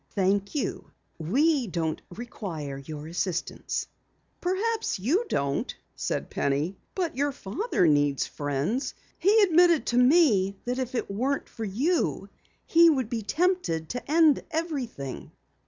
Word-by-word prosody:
"Thank 200 +3 +1
you. 290 - -2 0.3
We 265 - +2
don't 165 -4 -2
require 175 - -6
assistance." 160 +5 -3 0.6
"Perhaps 430 +5 0
you 300 - +1
don't," 140 0 -1 0.2
said - - -3
Penny, 145 +7 0 0.2
"but 355 -7 -1
your 285 +2 +1
father 250 - -1
needs 145 -3 +3
friends. 145 - -2 0.2
He 415 +5 +5
admitted 345 -3 +5
to 240 - +2
me 250 - +4
that 250 +1 -2
if 255 -1 -3
it 235 - -2
weren't 260 +8 -1
for 225 - -6
you 270 - 0 0.4
he 335 0 +6
would 260 -7 0
be 230 -2 -1
tempted 305 - 0
to 245 +3 -5
end 315 -2 +5
everything." 280 - -4
240 Hz, 125 wpm, -27 LUFS, -, 0.6 s, he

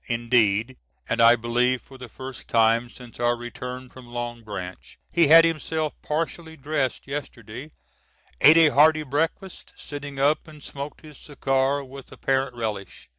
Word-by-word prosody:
Indeed, 115 0 +1 0.3
and 115 - 0
I 115 +1 +7
believe 120 +2 0
for 135 +1 -16
the 125 -2 -9
first 130 +2 -9
time 115 +1 +3
since 125 -1 -14
our 120 0 +2
return 125 +1 -7
from 125 -1 -14
Long 120 0 -5
Branch, 95 -4 -8
he 170 -3 +4
had 165 +2 +8
himself 160 -1 -2
partially 160 +1 -4
dressed 140 -2 -2
yesterday, 135 -1 -7 0.7
ate 150 +4 +8
a 165 -2 +7
hearty 155 +2 +4
breakfast, 160 +7 -3
sitting 145 -1 -8
up, 145 +4 +1
and 150 -2 -14
smoked 140 +1 -8
his 150 -3 -13
cigar 135 -1 -1
with 135 0 -12
apparent 135 -1 -1
relish. 105 - -6
130 Hz, 150 wpm, -24 LUFS, 120-150 Hz, 0.7 s, had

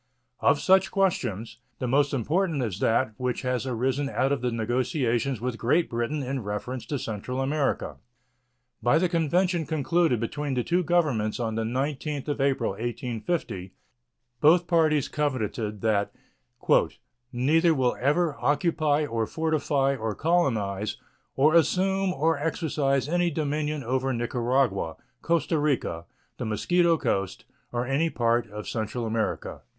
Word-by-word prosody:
Of - - +3
such 190 0 +4
questions, 120 - -1 0.2
the 125 - -3
most 140 +3 +2
important 150 - 0
is 105 -4 -3
that 115 +1 +1
which 125 0 -2
has 125 0 -1
arisen 130 +3 -1
out 135 0 0
of 140 - 0
the 125 -1 0
negotiations 120 +1 0
with 120 0 -3
Great 155 +8 +2
Britain 120 +5 -2
in 135 0 -3
reference 105 +4 -5
to 145 - -2
Central 120 +2 -4
America. 140 +1 -1 0.8
By 120 - +4
the 180 +3 +2
convention 170 0 +1
concluded 160 -2 +1
between 140 +4 -3
the 125 - 0
two 175 +6 +1
Governments 145 -12 +1
on 115 -2 -1
the 115 - -1
19th 140 +4 -2
of 145 - -1
April, 135 -5 +1
1850, 115 - -4 0.7
both 170 +5 +5
parties 155 -5 +2
covenanted 110 -8 -2
that 105 -3 +1 1.2
"neither 160 +7 +3
will 130 -3 +1
ever" 150 +4 +1
"occupy, 150 -1 +1
or 115 -5 -2
fortify, 145 -4 0
or 110 -4 -3
colonize, 110 - 0 0.4
or 150 +4 +4
assume 190 +4 +2
or 160 -1 +1
exercise 145 -3 0
any 175 +2 +1
dominion 150 -1 -2
over 130 +2 0
Nicaragua. 120 -7 0 0.3
Costa 165 -1 +1
Rica, 125 - -1 0.3
the - - -3
Mosquito 170 - +2
Coast, 95 - -2 0.3
or 120 0 -1
any 140 +6 +1
part 120 -3 +1
of 105 0 -7
Central 115 +2 -3
America." 110 0 -2
135 Hz, 135 wpm, -26 LUFS, 115-155 Hz, 1.2 s, both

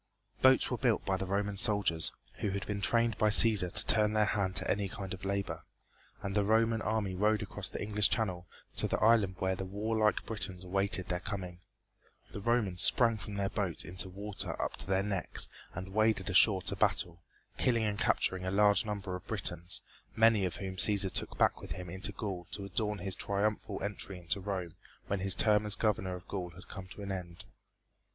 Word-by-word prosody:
Boats 130 0 +5
were 125 - -2
built 120 -5 +1
by 95 - +1
the 95 0 -4
Roman 100 +1 -1
soldiers, 100 -7 +1 0.3
who 105 - -1
had 100 0 -3
been 100 -1 -4
trained 115 +1 +1
by 110 - +4
Cæsar 105 -4 +7
to - - +1
turn 105 -1 +3
their 110 0 +3
hand 95 -3 -1
to - - +3
any 100 -1 0
kind 100 -3 -6
of 95 - -9
labor, 100 0 -3 0.6
and 100 - -3
the 105 0 +2
Roman 110 +2 +2
army 105 -3 -1
rowed 105 +3 +1
across - - -3
the - - -6
English 105 0 +2
channel 90 -6 -2 0.3
to - - +4
the - - -1
island 105 -4 +3
where 95 0 0
the 95 - -5
warlike 105 +3 0
Britons 95 -4 -1
awaited 95 0 0
their 90 - -1
coming. 90 -2 -6 0.7
The 100 - -7
Romans 105 -5 +1
sprang 115 -3 +5
from 100 0 -7
their 100 -1 -1
boats 95 -6 -2
into 95 +3 -2
water 100 +2 -5
up - - -2
to - - -6
their 95 0 +1
necks 100 -3 -1 0.3
and 95 +2 -7
waded 110 -3 +1
ashore 95 0 +4
to - - 0
battle, 85 -1 0 0.4
killing 115 -3 +2
and 105 -1 -1
capturing 95 -1 +1
a 95 - -2
large 105 +1 +3
number 100 -3 -4
of 90 - -10
Britons, 85 +1 -2 0.3
many 110 -3 +4
of 90 - -3
whom 95 -1 -6
Cæsar 100 -1 +3
took - - -2
back - - +2
with - - -6
him 90 0 -8
into 95 +3 -2
Gaul 95 -3 -5
to 100 - -5
adorn 105 +2 -2
his 95 0 -4
triumphal 100 0 -2
entry 100 -1 -4
into 90 +3 -1
Rome 95 -4 -4 0.3
when 100 - -2
his 95 0 +2
term 105 -1 +3
as 105 -1 +2
governor 95 -4 -1
of 90 - -11
Gaul 90 -3 -4
had 90 - -13
come 95 -1 -8
to 100 +2 -10
an 100 - -5
end. 90 -1 -7
100 Hz, 205 wpm, -32 LUFS, 95-105 Hz, 0.7 s, Cæsar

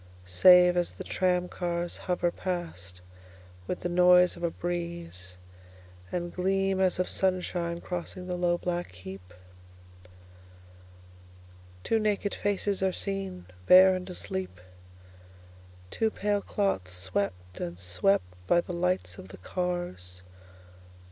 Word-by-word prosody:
Save, 180 - +6
as 175 - +1
the - - -9
tram 180 -1 0
cars 175 -1 -3
hoverPast 175 - -3 0.7
with 180 - -3
the - - -1
noise 180 0 +5
of 170 - -11
a 170 - +2
breezeAnd 90 - -7
gleam 195 +1 0
as 185 -1 +2
of 185 - 0
sunshine 180 -2 0
crossing 180 +1 -5
the 180 - -4
low 175 -1 +1
black 175 - -3
heap, 90 0 -10 2.5
Two 225 - +1
naked 210 -1 0
faces 205 -1 -1
are 190 -1 +2
seenBare 185 - +3
and 185 0 -6
asleep, 185 - -5 1.3
Two 225 - +1
pale 205 -1 -1
clots 195 - -1
swept 90 0 -3
and 85 0 -5
swept 90 +1 +1 0.2
by 175 - +4
the 175 - -4
light 175 - -1
of 95 - -10
the 95 - -12
cars. 90 - -4
175 Hz, 115 wpm, -28 LUFS, -, 2.5 s, Save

